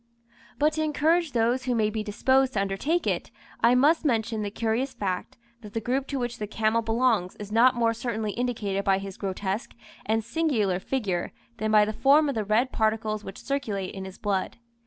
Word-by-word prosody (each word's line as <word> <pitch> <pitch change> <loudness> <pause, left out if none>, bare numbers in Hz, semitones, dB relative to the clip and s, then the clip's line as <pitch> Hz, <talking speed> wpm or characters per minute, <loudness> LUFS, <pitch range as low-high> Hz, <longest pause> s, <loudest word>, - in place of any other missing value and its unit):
But 300 +2 +2
to 315 - -1
encourage 310 +1 +1
those 240 +2 +1
who 250 -1 0
may 215 -2 +1
be 220 0 -2
disposed 260 +5 +2
to 195 - +1
undertake 200 - -1
it, - - -1 0.3
I 235 +2 +5
must 300 +7 +4
mention 225 -5 0
the 205 - -2
curious 225 +5 -1
fact, 185 -3 -3 0.2
that 210 -2 -11
the 225 - -1
group 260 +4 -1
to 280 - -3
which 245 -1 -3
the 210 - -3
camel 220 +2 +1
belongs 225 -4 +1
is 210 0 -9
not 245 +3 +5
more 230 -1 +2
certainly 225 -2 -3
indicated 215 -5 -2
by 195 -1 +3
his 195 -1 -6
grotesque 195 +2 -3 0.3
and 220 +1 0
singular 230 - 0
figure 195 -6 -2 0.2
than 215 - -1
by 210 -1 +6
the 215 - -3
form 285 +6 +4
of - - -1
the 220 - -1
red 220 +5 +1
particles 215 -1 0
which 195 - -8
circulate 215 -9 -3
in 190 -1 -6
his 190 0 -9
blood. 195 -3 -2
225 Hz, 200 wpm, -26 LUFS, 205-255 Hz, 0.3 s, by